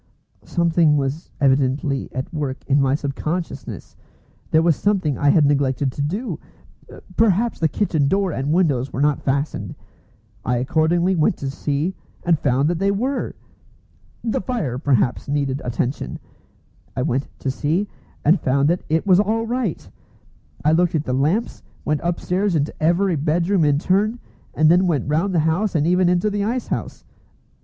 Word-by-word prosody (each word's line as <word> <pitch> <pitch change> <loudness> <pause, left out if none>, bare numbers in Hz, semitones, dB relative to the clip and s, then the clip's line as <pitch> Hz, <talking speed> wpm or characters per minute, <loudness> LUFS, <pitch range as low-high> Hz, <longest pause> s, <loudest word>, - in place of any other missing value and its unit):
Something 165 -3 +2
was 140 +3 -3
evidently 135 0 +1
at 130 +6 -5
work 145 -4 -4
in 140 +1 +3
my 135 0 +2
sub 140 -2 -3
consciousness. 165 +5 -5 0.5
There 160 +1 +3
was 165 -2 +4
something 185 -8 0
I 145 - +2
had 150 0 +5
neglected 140 -1 +1
to 145 - -5
do. 200 - -3 0.8
Perhaps 225 +1 +2
the 160 - +3
kitchen 155 -5 0
door 195 +3 +1
and 140 0 -2
windows 145 -7 +1
were - - -4
not 145 0 +2
fastened. 140 +2 -2 0.7
I 125 0 0
accordingly 165 +8 +1
went 155 -3 +2
to 135 -1 -4
see, 145 +6 -2 0.3
and 170 -3 +2
found 135 +1 +1
that 170 0 -1
they 195 +1 +2
were! 250 +8 -1 0.9
The 225 -2 -1
fire 185 - -2
perhaps 130 -4 +1
needed 140 -1 -1
attention. 125 +2 -3 0.8
I 125 - -1
went 130 +3 0
in - - -23
to 135 - -2
see, 160 +9 -1 0.4
and 165 +6 +5
found 140 +2 +2
that 175 +1 +1
it 160 +3 +1
was 185 -2 +5
all 220 +2 +1
right! 235 -6 -2 0.8
I 155 - +5
looked 170 +1 +2
at 150 - 0
the 130 - -2
lamps, 155 - 0 0.2
went 150 -1 0
upstairs 180 +2 0
into 150 -1 0
every 175 +3 +2
bedroom 170 +5 +1
in 145 -1 +3
turn, 205 +8 +1 0.4
and 155 - +4
then 180 +3 +5
went 150 -8 0
round 170 +6 0
the 165 - +4
house, 180 +5 0
and 150 -1 +2
even 180 +1 +3
into 180 +4 +1
the 205 0 -1
ice 235 +4 -1
house. - - -4
160 Hz, 165 wpm, -21 LUFS, 140-185 Hz, 0.9 s, had